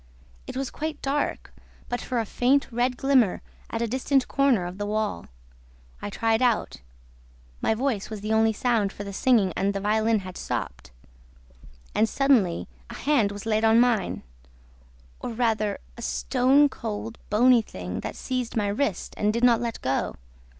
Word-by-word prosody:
It - - -6
was 270 -1 -3
quite 310 -1 -4
dark, 280 +2 -2 0.3
but 245 - -3
for 250 -2 -2
a 225 - -1
faint 260 +6 +2
red 245 +2 0
glimmer 260 -8 +2 0.3
at 230 0 -2
a - - 0
distant 260 +2 +1
corner 270 -9 +2
of 180 +3 -7
the 205 - -2
wall. 215 - -2 0.7
I - - -4
tried 225 +3 +1
out. 245 -3 +1 0.8
My 220 - +2
voice 235 -4 -1
was 215 -2 -6
the 215 +1 -1
only 220 0 +4
sound, 220 -2 +1
for 205 - -7
the 200 0 -7
singing 210 -5 +3
and 200 +1 0
the - - 0
violin 215 +1 +2
had 185 -1 -8
stopped. - - -4 1.0
And, 220 +1 +2
suddenly, 235 - +2 0.2
a - - -8
hand 245 -8 +2
was 205 +1 -8
laid 220 0 +1
on 225 +1 +5
mine... 235 -5 +1 1.0
or 235 - -5
rather 220 -3 0 0.2
a 235 - -10
stone 265 +4 +3
cold, 225 -3 -6
bony 240 +3 +5
thing 90 - -6
that - - -5
seized 255 -3 -3
my 205 -2 +1
wrist 205 -3 -2
and 210 0 +2
did 235 +2 -2
not 240 -2 +5
let 235 -1 -4
go. 130 +1 -1
225 Hz, 170 wpm, -25 LUFS, 205-250 Hz, 1.0 s, on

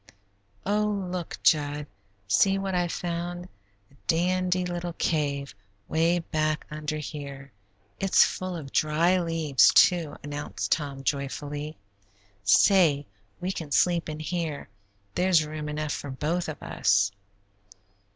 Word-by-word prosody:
"Oh, 205 -1 0
look, 180 -2 -4
Jud! 145 -1 +2 0.4
See 195 - +4
what 195 -1 -2
I've 175 -1 0
found 175 0 -4 0.5
a - - -22
dandy 180 +2 +1
little 175 -1 -4
cave 140 -4 -1 0.3
way 165 +2 +2
back 155 -2 -1
under 155 0 -3
here. 140 -2 -7 0.5
It's 195 -1 +5
full 185 -1 -4
of 140 -5 -7
dry 165 +4 +3
leaves, 165 -6 +4
too," 170 -4 +4
announced 145 0 -4
Tom, 140 -3 -1
joyfully. 145 +2 -3 0.7
"Say, 145 - +5 0.3
we 180 +1 -2
can 165 -5 -6
sleep 170 +1 +2
in 155 0 -5
here; 155 -1 -3 0.4
there's 180 -3 +3
room 150 0 -5
enough 150 0 -2
for 145 - -5
both 155 +6 -2
of 155 - -7
us." 100 0 +2
160 Hz, 120 wpm, -27 LUFS, 145-175 Hz, 0.7 s, It's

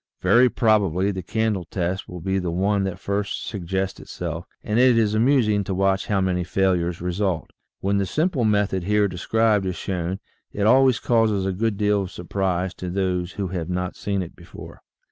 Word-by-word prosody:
Very 125 +1 +5
probably 100 -5 +2
the 95 -1 -4
candle 105 -1 -1
test 90 +2 -3
will 90 -1 -7
be 95 +2 0
the 90 -2 -2
one 100 +3 +1
that 95 -2 -3
first 100 +1 -3
suggests 95 -1 -3
itself, 85 0 -6 0.2
and 105 +2 0
it 125 -2 +5
is 110 -2 +2
amusing 110 -3 +3
to 95 - -2
watch 95 0 +1
how 100 -2 +1
many 90 -1 0
fail 95 +1 +2
ures 85 -1 -2
result. 90 -1 -2 0.3
When 100 +1 +1
the 100 - 0
simple 155 - 0
method 100 -4 +1
here 105 +1 +3
described 105 +2 +1
is 90 - -2
shown 90 0 -3 0.3
it 100 - -1
always 130 +2 +5
causes 110 -5 +2
a 95 - 0
good 110 +2 -1
deal 105 -1 +2
of 95 - -4
surprise 90 0 -2
to 90 - -3
those 90 -1 -1
who 100 -3 -3
have 90 -2 -4
not 90 0 -2
seen 100 -2 -2
it 85 - -10
before. - - -12
95 Hz, 190 wpm, -23 LUFS, 90-105 Hz, 0.3 s, Very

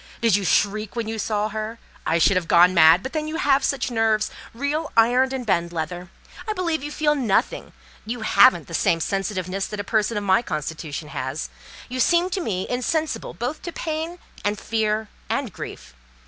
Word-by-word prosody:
Did 230 -4 +3
you 205 - 0
shriek 205 +3 +1
when 230 -2 -2
you 220 0 -4
saw 210 0 -1
her: 215 +2 -5 0.3
I 165 - +3
should 175 +4 +4
have 180 -2 0
gone 175 +2 +6
mad; 165 +1 +6
but 260 - -6
then 310 -1 -2
you 310 - -4
have 280 -5 +2
such 265 -2 0
nerves!—real 230 +7 -1
iron 250 +3 +4
and 260 -2 -4
bend 170 -4 +1
leather! 175 +2 -4 0.4
I 430 - 0
believe 335 -7 -1
you 295 - -5
feel 300 0 +2
nothing. 240 -9 0 0.3
You 230 +2 -5
haven't 200 -6 +5
the 165 - -10
same 165 0 +2
sensitiveness 195 +1 -2
that 210 - -6
a - - -2
person 215 +2 0
of 205 - -2
my 200 +3 +4
constitution 155 -6 -5
has. 135 +2 -4 0.4
You 255 +1 -5
seem 345 +7 +3
to 380 - -1
me 190 - -2
insensible 310 +5 -2
both 250 +6 -4
to 345 - -5
pain 320 +1 -4 0.3
and 205 +1 0
fear 220 -1 -1 0.2
and 265 -7 -2
grief. - - -8
220 Hz, 190 wpm, -23 LUFS, 185-270 Hz, 0.4 s, gone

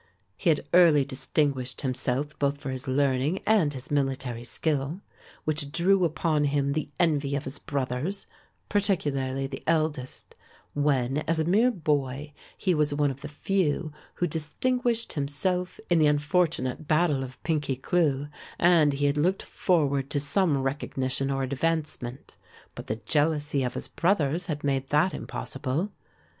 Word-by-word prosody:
He 170 - 0
had 150 -2 +1
early 165 -6 +6
distinguished 130 -1 -1
himself 130 +2 -2
both 140 0 +1
for 135 -1 -5
his 130 0 -5
learning 135 +4 +1
and 205 -9 +3
his 130 -1 -8
military 135 -4 -1
skill, 145 +6 -2 0.4
which 150 -2 -1
drew 180 +5 +3
down 180 - +3
upon 155 -1 0
him 140 -1 +1
the 155 0 -2
envy 145 -5 +2
of 140 - -2
his 135 +1 -5
brothers, 140 +7 -3 0.4
particularly 140 -10 0
the 135 0 -6
eldest, 155 -5 -1 0.4
when, 140 -2 +1
as 165 0 +1
a - - +2
mere 205 +9 +4
boy, 145 - -1 0.2
he 185 - +1
was 150 -2 +1
one 145 -1 +2
of 135 +1 -10
the - - -6
few 155 0 -1 0.2
who 175 - 0
distinguished 230 +10 0
himself 180 +6 -1
in 175 -2 +3
the 155 - +5
unfortunate 150 -2 +1
battle 155 -3 +2
of 130 0 -8
Pinkey 145 -5 0
Cleugh 145 0 +1 0.3
and 165 -4 +5
he 140 +1 0
had 140 +1 +2
looked 180 +6 +1
forward 140 -6 +1
to 145 - 0
some 145 +2 +2
recognition 135 -1 -1
or 135 -1 0
advancement, 140 -2 -3 0.4
but - - -9
the 110 - -1
jealousy 145 0 +1
of 125 -1 -2
his - - -3
brothers 170 -3 +1
had 150 -3 -3
made 135 -1 0
that 150 +5 +3
impossible. 130 - -3
145 Hz, 150 wpm, -27 LUFS, 135-165 Hz, 0.4 s, early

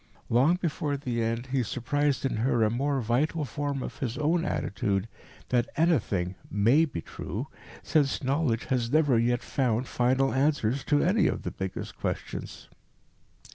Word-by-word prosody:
Long 135 +9 +4
before 150 -5 -2
the 125 -4 -2
end 115 +2 -1
he 135 -1 +2
surprised 135 +5 0
in 135 - -1
her 115 0 +2
a 105 - +2
more 135 +3 0
vital 145 +7 0
form 140 +2 -3
of - - -7
his 125 -2 -3
own 160 +3 +1
attitude 100 - -1 0.4
that 120 -1 +1
anything 105 - +1 0.2
may 115 +11 +4
be 135 - -5
true, - - -5 0.4
since 145 -2 +1
knowledge 130 -3 0
has 120 -3 0
never 145 -6 +4
yet 120 +1 +1
found 125 -2 0
final 130 +2 +2
answers 135 -2 +1
to 145 -1 +3
any 185 0 +3
of - - -2
the - - -3
biggest 95 -1 -5
questions. - - -5
130 Hz, 155 wpm, -28 LUFS, 115-145 Hz, 0.4 s, Long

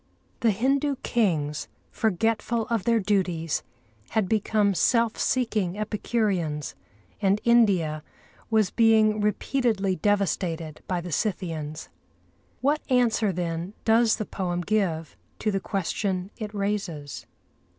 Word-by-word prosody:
The 230 - +3
Hindu 275 +7 +1
kings, 155 -10 0 0.2
forgetful 225 +2 0
of 225 -5 0
their 230 -1 +3
duties, 185 -6 0 0.5
had 220 -4 +1
become 210 0 +2
self 230 +4 +2
seeking 215 -7 0
epicureans, 200 - -1 0.5
and 200 0 +3
India 195 -10 +3 0.5
was 220 -4 +2
being 220 -2 +4
repeatedly 210 -2 0
devastated 175 -5 -1
by 180 -2 -1
the 175 0 -7
Scythians. 160 -5 -3 0.7
What 290 +3 +2
answer, 235 -5 +3
then, 175 +2 -3
does 225 0 +4
the 215 - -4
poem 175 -3 -2
give 175 -5 -1 0.2
to 215 - 0
the 195 - 0
question 190 0 -2
it 215 -3 -6
raises? 200 -8 -3
205 Hz, 110 wpm, -26 LUFS, 175-225 Hz, 0.7 s, being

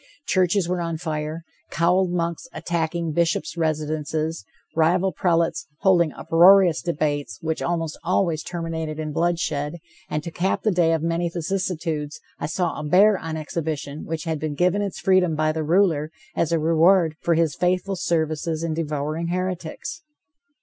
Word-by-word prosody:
Churches 185 0 +2
were 180 0 -1
on 165 -1 -2
fire, 155 0 -4 0.3
cowled 180 +2 +2
monks 170 +3 -2
attacking 170 -1 -2
bishops' 170 +1 0
residences, 155 - -2 0.3
rival 175 +4 +3
prelates 165 -5 +1
holding 175 -5 +4
uproarious 175 0 +5
debates, 150 -4 -2
which 160 0 -2
almost 165 -2 -2
always 170 -2 +1
terminated 165 -3 -4
in 155 -1 -3
bloodshed, 165 -3 -1 0.3
and, 150 0 -2
to 170 - -6
cap 185 +3 -1
the 215 - +3
day 170 -3 +3
of 160 -1 -1
many 170 +1 0
vicissitudes, 165 -3 -3 0.2
I - - -2
saw 170 +1 -1
a - - -5
bear 195 +7 +5
on 160 -1 -4
exhibition 155 -2 -4
which 160 -1 -4
had 160 -2 -2
been 155 -1 -3
given 180 +5 +2
its 200 -2 -3
freedom 185 -4 +3
by 155 0 +1
the 160 0 -2
ruler, 160 -2 +2 0.3
as 165 - 0
a 165 - +3
reward 165 +1 +4
for 170 - +2
his 160 -2 +2
faithful 180 +3 0
services 160 -2 -1
in 165 -1 -1
devouring 155 +1 -2
heretics. 180 - -4
165 Hz, 155 wpm, -23 LUFS, 155-175 Hz, 0.3 s, uproarious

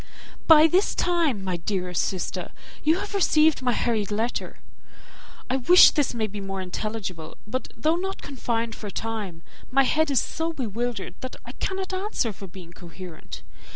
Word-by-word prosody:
"By 315 -1 +9
this 360 +5 +3
time, 330 - +1
my 185 -2 -1
dearest 180 0 -1
sister, 185 -2 -3 0.3
you 315 +3 +4
have 405 +2 -5
received 315 -7 +4
my 250 -1 +1
hurried 220 -5 0
letter; 220 +3 -2 0.9
I 260 - +1
wish 350 +8 +8
this 285 -5 0
may 225 -2 0
be 205 -1 -6
more 195 0 -4
intelligible, 185 -3 -5
but 255 +5 -4
though 315 +2 +2
not 385 +2 -4
confined 235 -4 -2
for 210 - -7
time, 205 -6 -5 0.3
my 275 +1 +4
head 315 +3 +2
is 270 -4 +3
so 325 +6 -2
bewildered 235 -4 -3
that 255 - -6
I - - -7
cannot 380 -1 -3
answer 375 - -1
for 195 0 -10
being 175 -2 -12
coherent. 165 - -10
230 Hz, 160 wpm, -25 LUFS, 195-315 Hz, 0.9 s, By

